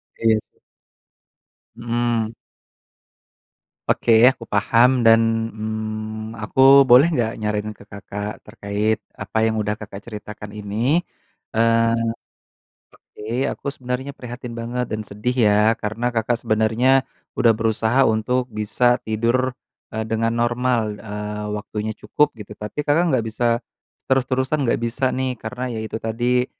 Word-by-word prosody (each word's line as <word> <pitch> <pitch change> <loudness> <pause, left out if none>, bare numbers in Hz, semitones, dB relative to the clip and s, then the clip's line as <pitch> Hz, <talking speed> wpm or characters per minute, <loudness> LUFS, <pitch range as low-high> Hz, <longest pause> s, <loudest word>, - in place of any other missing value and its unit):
Iya, 115 -1 +3
sih. - - -22 1.2
Mhm. 115 -1 -1 1.5
Oke, 115 - +2 0.2
aku 130 -3 +1
paham 115 +4 +3
dan, 115 0 +4
mmm, 110 0 -5
aku 135 +4 +7
boleh 130 +4 +7
nggak 120 -9 0
nyaranin 105 0 -2
ke 100 0 -15
Kakak 100 +1 -7
terkait 105 0 -2 0.2
apa 100 +2 -5
yang 110 - 0
udah 105 0 -2
Kakak 100 -1 -9
ceritakan 105 -1 -9
ini? 105 +9 0 0.6
Eee, 115 0 +3 1.0
oke, 105 - -15 0.3
aku - - -11
sebenernya 130 0 -4
prihatin 125 -2 -8
banget 120 +2 -3
dan 110 - -2
sedih 105 +5 -2 0.2
ya 105 +2 +4
karena 115 +3 -2
Kakak 115 +1 0
sebenernya 110 +5 +3 0.4
udah 115 -1 +5
berusaha 115 +3 +2
untuk 125 +2 0
bisa 120 +3 +1
tidur, 120 +4 0 0.4
eee, 110 0 -2
dengan 115 +1 0
normal, 120 -3 0
eee, 105 0 -5
waktunya 105 +1 -4
cukup 150 -4 0
gitu. 105 -1 -9
Tapi 105 +8 -5
Kakak 160 +4 +2
nggak 130 -7 +1
bisa 120 +2 0 0.4
terus-terusan, 130 +1 0
nggak - - +1
bisa 125 +3 0
nih, 130 0 -1
karena 125 +2 -4
ya 110 - -4
itu 110 0 -5
tadi, 120 +3 0
115 Hz, 130 wpm, -21 LUFS, 110-125 Hz, 1.5 s, aku